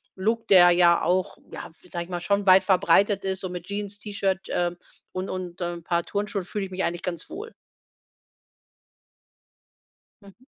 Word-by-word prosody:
Look“, 225 +4 -1
der 175 -2 +7
ja 175 -1 +4
auch 180 +2 0
ja, - - -8 0.2
sage 170 -1 -4
ich - - -20
mal, 175 -1 -4
schon 200 +2 0
weit 185 +1 +7
verbreitet 195 +1 +3
ist 190 0 -3
und 185 - -4
„mit 180 -1 -7
Jeans, 205 0 -5
T-Shirt, 200 -3 -1
ähm, 175 0 -1 0.3
und 185 +1 -4
und 185 -1 -6
'n 175 -1 -4
paar 170 0 0
Turnschuhen, 205 -1 -3
fühle 205 +1 -4
ich 190 - -11
mich 190 +1 -2
eigentlich 175 +1 -2
ganz 170 -2 -5
wohl“. 445 +3 -8 2.7
Mhm. 200 +5 -18
185 Hz, 165 wpm, -25 LUFS, 175-200 Hz, 2.7 s, der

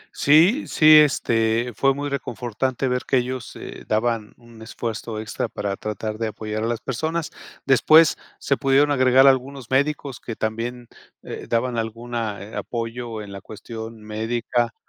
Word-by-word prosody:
Sí, 170 - +4
sí, 155 0 +7
este 115 -5 +2
fue 135 +3 +2
muy 145 0 -3
reconfortante 130 -1 -3
ver 125 0 0
que 130 - +1
ellos, 125 0 -3
eh, - - -9
daban 110 -1 -1
un 115 -2 -16
esfuerzo 115 -1 -5
extra 110 0 -3
para 100 -1 -3
tratar 110 +1 -5
de 115 - -1
apoyar 110 0 -5
a 115 - 0
las 115 -1 -2
personas. 160 +5 -3 0.3
Después, 155 +5 +6 0.2
se 140 - 0
pudieron 140 +2 +3
agregar 130 -1 +5
algunos 135 -1 +1
médicos 140 -1 0
que 115 - -7
también, 115 +3 -4 0.4
eh, - - -8
daban 120 0 0
alguna, 115 -2 -4
eh, 105 - -10
apoyo 115 -1 -5
en 100 - -10
la 100 - -8
cuestión 110 +2 -9
médica, 115 +2 -2
120 Hz, 155 wpm, -23 LUFS, 110-135 Hz, 0.4 s, sí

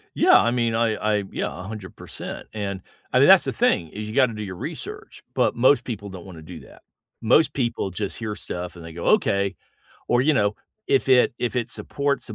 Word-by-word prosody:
Yeah, - - +6
I 120 - +2
mean, 120 -2 0
I 115 -1 +2
I 105 -1 0
yeah, - - -2
100%, 95 -1 -7
and, 100 -3 -4 0.3
I - - +4
mean, - - +6
that's - - +8
the - - -1
thing 80 - +1
is 105 +5 -7
you 110 - -7
gotta 130 -4 +4
do 105 - -6
your 95 -3 -6
research, - - -7
but - - +2
most 130 +4 +4
people 105 -4 -6
don't 95 -3 -9
wanna 85 -4 -11
do 80 +1 -10
that. - - -17 0.4
Most 140 +8 +4
people 120 -6 -1
just 100 +2 -4
hear 110 -3 -4
stuff, 90 -3 -6
and 85 - -11
they 85 - -9
go, 85 +1 -7
"Okay," 100 -1 +2 0.5
or, 120 - +3
you 155 +3 +3
know, 105 -3 +1 0.3
if 135 -1 +2
it 125 -2 +5
if 120 +1 -2
it 120 -1 -1
supports 140 +3 -2
a - - -6
105 Hz, 215 wpm, -23 LUFS, 95-120 Hz, 0.5 s, that's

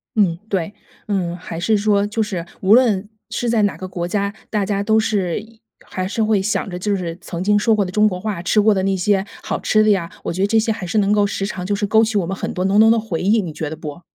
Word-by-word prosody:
嗯， 185 -6 +2
对， 190 0 -2 0.3
嗯， 185 -4 -1
还 165 -1 -7
是 215 +5 +2
说 205 -1 +2
就 210 +2 -2
是 185 -6 -4 0.2
无 195 +2 +5
论 220 -5 +4 0.2
是 240 - -2
在 225 -1 +2
哪 205 - 0
个 185 - -6
国 175 -1 -4
家， 200 +2 -1 0.2
大 210 -2 0
家 200 0 -1
都 220 +1 +3
是 195 -6 0
一 220 +1 -15 0.2
还 185 0 -4
是 220 +3 -1
会 215 -2 +2
想 200 0 -1
着 180 - -5
就 205 +2 0
是 170 -3 -4
曾 170 0 -5
经 205 +1 +3
说 220 +2 +3
过 205 -2 +1
的 180 - -6
中 210 +3 +4
国 180 -3 -3
话， 200 -3 -3
吃 185 +4 +2
过 210 +1 +5
的 190 - 0
那 195 0 +1
些 195 +1 +1 0.2
好 - - -2
吃 215 0 +3
的 215 - +3
呀， 175 -4 0
我 - - -3
觉 185 - -3
得 200 - +3
这 225 +2 +3
些 225 +1 0
还 210 -4 -4
是 180 +5 -2
能 200 -1 +3
够 205 -1 +3
时 195 - -3
常 185 -2 -5
就 205 +2 0
是 205 +1 -1
勾 220 +2 +4
起 220 -1 0
我 190 - +1
们 190 +3 -3
很 - - -4
多 185 - -2
浓 195 +2 +3
浓 225 +1 +7
的 230 - +3
回 215 -7 -4
忆， 210 +4 +3
你 170 -5 -6
觉 150 0 -4
得 160 - -5
不？ 155 +1 -8
200 Hz, 310 characters per minute, -20 LUFS, 185-215 Hz, 0.3 s, 浓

